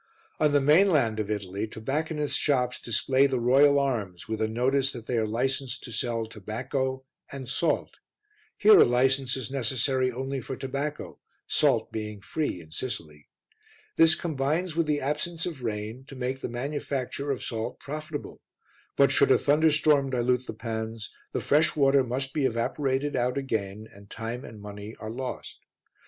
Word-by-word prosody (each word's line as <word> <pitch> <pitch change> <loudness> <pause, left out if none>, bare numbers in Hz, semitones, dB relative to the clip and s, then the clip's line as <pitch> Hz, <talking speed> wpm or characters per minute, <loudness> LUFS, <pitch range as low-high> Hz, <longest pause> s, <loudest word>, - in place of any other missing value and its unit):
On 150 -1 +3
the 145 - +4
mainland 150 - +4
of 105 -1 -2
Italy, 100 0 -3
tobacconists' 150 +7 -2
shops 125 -4 +1
display 130 +3 +2
the 130 -2 -1
Royal 140 +4 +5
Arms 110 -11 -1
with 110 0 -3
a 110 - +2
notice 130 +4 +1
that 120 -3 -8
they 125 - -2
are 110 -1 +1
licensed 130 +3 -1
to 120 - -7
sell 115 0 -1
tobacco 130 +5 -3 0.3
and 135 -2 -7
salt. 150 +4 -1 0.6
Here 215 +1 +7
a - - +10
license 130 +2 +2
is 130 0 -5
necessary 130 0 +1
only 135 +2 -3
for 130 - -6
tobacco, 140 +3 -4 0.3
salt - - +2
being 105 -1 -5
free 145 - -3
in 80 -1 -16
Sicily. 80 - -6 0.7
This 165 0 +6
combines 155 +2 -1
with 165 -2 +1
the 150 -1 +1
absence 155 +4 -1
of 160 -7 -5
rain 110 +2 -4
to 135 - -11
make 130 +1 -3
the - - -3
manufacture 140 +2 -3
of 135 - -2
salt 115 +1 -4
profitable; 150 +1 -6 0.6
but - - +5
should - - +4
a - - +6
thunderstorm 150 -2 +3
dilute 125 0 0
the - - -4
pans, 110 -1 -5 0.2
the - - -2
fresh 150 +2 +3
water 140 -2 +4
must 130 +2 -3
be 145 -3 +1
evaporated 135 +4 -1
out 125 +1 0
again 110 -5 -3
and 100 0 -16
time 115 +3 -5
and 110 -2 -11
money 105 +1 -8
are 110 0 -6
lost. 130 +2 -6
130 Hz, 165 wpm, -27 LUFS, 115-140 Hz, 0.7 s, a